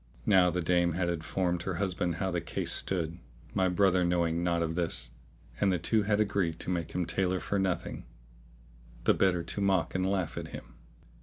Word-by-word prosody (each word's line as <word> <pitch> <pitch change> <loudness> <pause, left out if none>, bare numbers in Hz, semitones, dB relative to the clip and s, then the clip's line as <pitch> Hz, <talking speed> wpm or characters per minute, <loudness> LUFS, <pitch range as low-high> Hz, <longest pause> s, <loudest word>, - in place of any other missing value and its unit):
Now 95 -3 +5
the 90 0 -2
dame 85 0 +2
had 85 +1 0
informed 85 +1 -1
her 95 0 -3
husband 90 -2 -1
how 95 +2 -2
the 85 -1 -1
case 85 - -2
stood 85 -2 0 0.3
(my 95 -1 +2
brother 95 0 +3
knowing 85 -1 +1
naught 85 -1 +1
of 80 0 -2
this); 85 -7 -1 0.5
and 100 -1 +3
the 90 - +2
two 105 +6 +2
had 105 0 +1
agreed 100 -6 0
to - - -2
make 85 -2 -3
him 90 -1 0
tailor 90 +1 0
for 100 - -1
nothing, 90 -8 -2 1.0
the - - +5
better 90 -3 +2
to 85 +4 -3
mock 95 -3 +1
and 95 - 0
laugh 95 -5 -1
at - - -6
him. - - -10
90 Hz, 190 wpm, -30 LUFS, 85-95 Hz, 1.0 s, Now